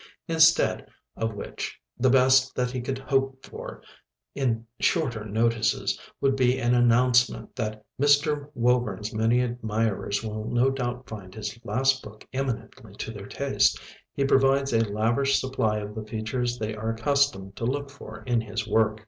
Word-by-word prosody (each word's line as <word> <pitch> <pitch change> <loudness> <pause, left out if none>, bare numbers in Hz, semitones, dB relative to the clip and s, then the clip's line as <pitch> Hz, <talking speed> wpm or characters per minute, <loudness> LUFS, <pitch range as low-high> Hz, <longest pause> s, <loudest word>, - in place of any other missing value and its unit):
Instead 160 -1 +4 0.3
of 115 -1 -2
which 100 - -6 0.2
the 130 +1 +2
best 130 0 +4
that 125 0 0
he 125 -1 -3
could 130 +2 -3
hope 135 0 -1
for - - -9 0.5
in 115 -4 -1
"shorter 125 -11 +1
notices" 115 +1 0 0.2
would 135 -1 +2
be 130 -1 +3
an 120 -1 +1
announcement 120 0 +3
that 110 -2 -4 0.2
"Mr. 145 0 +3
Woburn's 115 -4 0
many 115 +3 +2
admirers 110 -4 -1
will 110 0 -4
no 120 +2 +3
doubt 125 -1 -4
find 100 -3 -9
his 110 0 -5
last 130 +2 +1
book 105 0 -13
eminently 130 -4 -4
to 110 - -5
their 100 -2 -9
taste. 140 -1 +1 0.3
He 140 - -1
provides 135 0 +3
a 115 -1 +2
lavish 120 +6 +2
supply 120 -5 0
of 105 0 -5
the 110 0 -5
features 115 +3 -2
they 110 -2 -3
are 110 +1 -3
accustomed 115 -4 0
to 115 - -3
look 140 +3 -2
for 140 - -11
in 120 -2 +1
his 110 0 -4
work." 110 0 +2
120 Hz, 155 wpm, -26 LUFS, 110-135 Hz, 0.5 s, Instead